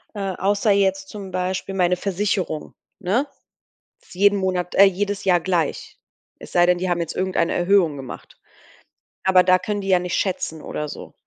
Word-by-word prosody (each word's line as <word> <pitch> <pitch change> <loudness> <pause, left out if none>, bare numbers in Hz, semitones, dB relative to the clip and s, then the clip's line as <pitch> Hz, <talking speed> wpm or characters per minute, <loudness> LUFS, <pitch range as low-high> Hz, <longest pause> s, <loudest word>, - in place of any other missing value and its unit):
Äh, 195 -2 -2
außer 200 +2 +1
jetzt 195 -1 +1
zum 195 -3 -8
Beispiel 185 +1 -3
meine 180 -1 +2
Versicherung, 185 -4 -2 0.3
ne? 215 +9 0 0.8
Ist - - -16
jeden 200 +2 +3
Monat 185 -2 -2
äh, 195 - +8
jedes 200 +1 0
Jahr 180 -2 +4
gleich. 170 -3 -2 0.4
Es - - -12
sei 175 0 +4
denn, 180 0 +3
die 185 0 -2
haben 175 -1 0
jetzt 165 -1 -4
irgendeine 185 -2 0
Erhöhung 175 -4 +2
gemacht, 135 -2 -10 0.8
aber 185 -1 +5
da 185 0 +4
können 205 +2 -3
die 195 - -5
ja 185 -1 +5
nicht 180 0 -3
schätzen 160 -5 -2
oder 150 - -5
so. - - -9
185 Hz, 175 wpm, -22 LUFS, 180-195 Hz, 0.8 s, äh